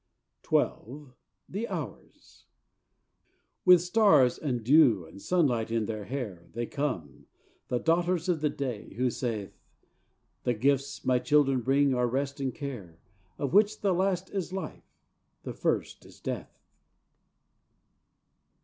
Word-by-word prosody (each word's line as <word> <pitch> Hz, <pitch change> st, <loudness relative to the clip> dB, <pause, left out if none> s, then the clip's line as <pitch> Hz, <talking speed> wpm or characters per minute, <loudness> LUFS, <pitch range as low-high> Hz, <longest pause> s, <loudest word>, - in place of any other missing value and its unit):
XII 135 Hz, +2 st, -1 dB, 0.3 s
The 215 Hz, +5 st, -4 dB
Hours -, -, -8 dB, 1.2 s
With 180 Hz, -2 st, +8 dB
stars 175 Hz, -, +4 dB
and 125 Hz, -6 st, -2 dB
dew 125 Hz, -, +5 dB
and 100 Hz, +5 st, -13 dB
sunlight 130 Hz, -, +1 dB
in 115 Hz, -1 st, 0 dB
their 105 Hz, -1 st, -5 dB
hair, 105 Hz, -10 st, -6 dB
They 120 Hz, +1 st, -2 dB
come, 115 Hz, -, -4 dB, 0.4 s
the 125 Hz, -, 0 dB
daughters 170 Hz, +4 st, +1 dB
of 170 Hz, -4 st, 0 dB
the 150 Hz, -, +2 dB
Day, 125 Hz, -9 st, -5 dB
who 125 Hz, +2 st, +1 dB
saith: 110 Hz, -6 st, -4 dB, 0.9 s
"The 120 Hz, -, 0 dB
gifts 140 Hz, +4 st, 0 dB
my 125 Hz, -1 st, +3 dB
children 135 Hz, -2 st, +3 dB
bring 135 Hz, +2 st, +3 dB
are 125 Hz, -1 st, +1 dB
rest 140 Hz, +3 st, -2 dB
and 135 Hz, -2 st, -1 dB
care, 120 Hz, -, -7 dB, 0.4 s
Of 140 Hz, +1 st, -3 dB
which 210 Hz, +1 st, +4 dB
the 195 Hz, -2 st, +2 dB
last 190 Hz, 0 st, 0 dB
is 190 Hz, -3 st, -3 dB
Life, 190 Hz, 0 st, -7 dB, 0.5 s
the -, -, -5 dB
first -, -, -2 dB
is -, -, -16 dB
Death." -, -, -5 dB
135 Hz, 130 wpm, -29 LUFS, 120-165 Hz, 1.2 s, With